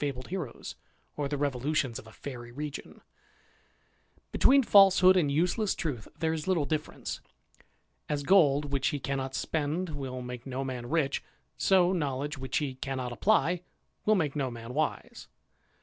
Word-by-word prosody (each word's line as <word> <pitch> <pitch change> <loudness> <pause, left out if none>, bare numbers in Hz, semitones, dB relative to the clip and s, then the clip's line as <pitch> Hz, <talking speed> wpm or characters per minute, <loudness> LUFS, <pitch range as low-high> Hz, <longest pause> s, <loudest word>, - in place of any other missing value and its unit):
bled 135 -3 -3
heroes, 175 -9 -5 0.4
or 145 -1 -1
the 145 +1 -2
revolutions 140 -2 -1
of - - -13
a - - -13
fairy 120 -1 -8
region. 145 +3 -7 1.3
Between 275 +1 +5
falsehood 190 -3 +7
and 155 -6 +2
useless 180 +7 +1
truth 135 -9 -4
there 160 -1 0
is 160 0 -4
little 175 -6 +2
difference. 155 0 -4 0.9
As 145 -1 -1
gold 145 -5 +4
which 135 -1 +1
he 145 - -1
cannot 135 0 -3
spend 160 +4 -1
will 135 -4 -5
make 125 +1 -7
no 135 +1 -3
man 125 -2 -5
rich, 150 -4 0 0.3
so 185 -1 +4
knowledge 145 -3 -2
which 130 -2 -3
he 145 -3 -1
cannot 130 -1 -4
apply 180 - +2 0.4
will 215 - +4
make 155 -7 0
no 135 -3 0
man 115 0 -8
wise. 155 +2 -3
145 Hz, 150 wpm, -29 LUFS, 130-165 Hz, 1.3 s, falsehood